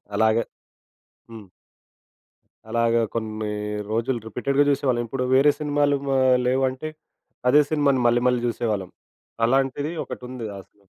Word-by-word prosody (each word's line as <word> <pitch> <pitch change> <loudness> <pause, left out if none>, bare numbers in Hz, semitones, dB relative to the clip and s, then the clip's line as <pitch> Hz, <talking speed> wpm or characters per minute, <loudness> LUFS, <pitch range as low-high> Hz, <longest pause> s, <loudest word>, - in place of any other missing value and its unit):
అలాగ. 110 +1 +3 0.9
హ్మ్. 110 -3 -10 1.2
అలాగా 115 0 +2
కొన్ని 110 -1 -3 0.4
రోజులు 115 +2 0
రిపీటెడ్‌గా 140 +5 +1
జూసేవాళ్ళం. 130 -4 +1
ఇప్పుడు 125 +1 -2
వేరే 145 +2 +6
సినిమాలు 145 -1 +1 0.2
ఆహ్, 130 -1 +4
లేవంటే 130 +3 0 0.6
అదే 150 +3 +6
సినిమాని 140 -4 +2
మళ్ళీ 120 +1 +2
మళ్ళీ 125 -1 +2
జూసేవాళ్ళం. 105 -5 -2 0.5
అలాంటిది 135 +4 0
ఒకటుంది. 125 -2 -7
ఆ - - -7
సి - - -47
125 Hz, 115 wpm, -23 LUFS, 115-140 Hz, 1.2 s, వేరే